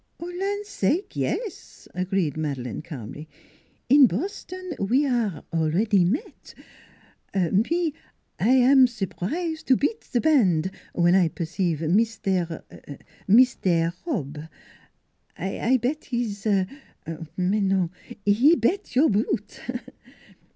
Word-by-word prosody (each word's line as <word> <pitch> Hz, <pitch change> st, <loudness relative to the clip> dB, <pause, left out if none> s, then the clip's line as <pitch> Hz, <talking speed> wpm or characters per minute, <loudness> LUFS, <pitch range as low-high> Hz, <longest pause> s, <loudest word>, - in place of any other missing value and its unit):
" -, -, -46 dB
Land 390 Hz, +4 st, -3 dB
sake 350 Hz, -, -1 dB
yes! 440 Hz, -7 st, -4 dB
" -, -, -38 dB
agreed 185 Hz, -4 st, -1 dB
Madeleine 135 Hz, -8 st, -3 dB
calmly. 150 Hz, -1 st, -9 dB, 0.3 s
" -, -, -38 dB
In 275 Hz, -3 st, +9 dB
Boston 370 Hz, -, -5 dB
we 250 Hz, +9 st, +2 dB
aire 235 Hz, -, -1 dB
already 175 Hz, +5 st, +2 dB
met. 220 Hz, -, -4 dB, 0.8 s
Me 230 Hz, -, +1 dB, 0.5 s
I 210 Hz, -, +1 dB
am 260 Hz, +1 st, +6 dB
sur 225 Hz, -5 st, -3 dB
prise 315 Hz, -, -3 dB
to 260 Hz, -, +3 dB
beat 445 Hz, +10 st, -2 dB
band 190 Hz, -, +3 dB, 0.2 s
when 175 Hz, 0 st, +3 dB
I 185 Hz, -2 st, +5 dB
perceive 165 Hz, 0 st, -2 dB
Mis 215 Hz, +7 st, +2 dB
taire 180 Hz, -5 st, -2 dB, 0.6 s
Mis 240 Hz, +5 st, +6 dB
taire 170 Hz, -2 st, +1 dB
Hobb; 155 Hz, -, -4 dB, 0.9 s
I 225 Hz, +7 st, 0 dB
bet 260 Hz, +6 st, -2 dB
his 225 Hz, -5 st, -3 dB
mais 185 Hz, -, -2 dB
non 190 Hz, -3 st, +1 dB, 0.3 s
he 240 Hz, +11 st, +5 dB
bet 340 Hz, -, -1 dB
your 280 Hz, +2 st, +5 dB
boot!" 210 Hz, 0 st, -1 dB
205 Hz, 115 wpm, -25 LUFS, 175-270 Hz, 0.9 s, In